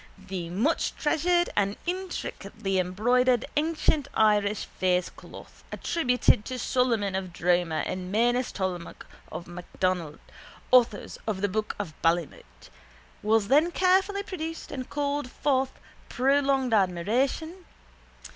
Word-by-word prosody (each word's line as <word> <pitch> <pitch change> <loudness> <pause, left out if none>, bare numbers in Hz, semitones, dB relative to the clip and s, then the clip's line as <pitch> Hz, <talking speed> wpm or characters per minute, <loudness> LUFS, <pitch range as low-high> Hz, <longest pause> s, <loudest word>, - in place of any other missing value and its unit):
The 190 -3 -6
muchtreasured 320 - +1
and 200 0 +1
intricately 350 - -3
embroidered 240 +7 +2
ancient 305 -1 +1
Irish 210 -1 +2 0.2
facecloth 180 -1 -2
attributed 250 -9 +2
to 255 - -4
Solomon 235 -6 +1
of 190 -1 -3
Droma 175 -2 +1
and 185 0 -4
Manus 240 +4 +2
Tomaltach 185 -3 -4 0.3
og 170 - -6
MacDonogh, 175 -2 -3 0.5
authors 235 -5 +3
of 200 -3 -2
the 205 - +1
Book 215 +2 -2
of 195 -6 -5
Ballymote, 165 - -2 0.5
was 215 -1 +2
then 300 +8 +4
carefully 380 +3 +2
produced 330 -4 -6
and 260 -2 -5
called 285 -2 -2
forth 265 0 0 0.4
prolonged 270 -1 +2
admiration. 240 - 0
225 Hz, 110 wpm, -27 LUFS, 185-285 Hz, 0.5 s, then